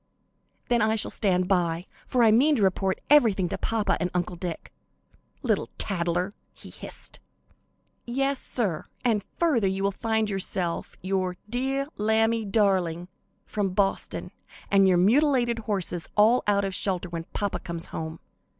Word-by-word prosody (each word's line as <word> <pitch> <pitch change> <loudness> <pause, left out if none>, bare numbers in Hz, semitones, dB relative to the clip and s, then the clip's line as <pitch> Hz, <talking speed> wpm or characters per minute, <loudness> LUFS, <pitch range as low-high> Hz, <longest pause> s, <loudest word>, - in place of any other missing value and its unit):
"Then 240 -1 +2
I 220 +1 +3
shall 220 - +1
stand 185 -3 +1
by, 175 -2 +1 0.2
for 250 -2 +2
I 225 - +6
mean 280 +7 +5
to 220 - +1
report 190 0 +1
everything 220 -11 +5
to - - -3
papa 225 -2 0
and 180 - 0
Uncle 175 0 -1
Dick." 170 -1 -6 0.7
"Little - - 0
tattler!" 180 0 -1 0.2
he - - -12
hissed. - - -4 0.9
"Yes, 270 +2 0
sir, 195 -11 -2 0.2
and 220 -4 +2
further 280 - +2
you 190 +1 -1
will 200 - +2
find 220 +2 0
yourself, 185 -3 -2
your 185 -1 -1
'deah 265 +4 -1
lambie 220 +1 +2
darling' 185 -5 +1 0.4
from 195 -3 -2
Boston, 195 -1 -1 0.4
and 195 -1 +5
your 185 -1 +4
mutilated 240 - +3
horses 180 -4 -1
all 220 +4 +5
out 200 -1 +3
of 195 - -3
shelter 185 -2 0
when 165 -1 -5
papa 205 +2 -3
comes 170 -2 -5
home. 160 0 -5
200 Hz, 150 wpm, -26 LUFS, 180-225 Hz, 0.9 s, I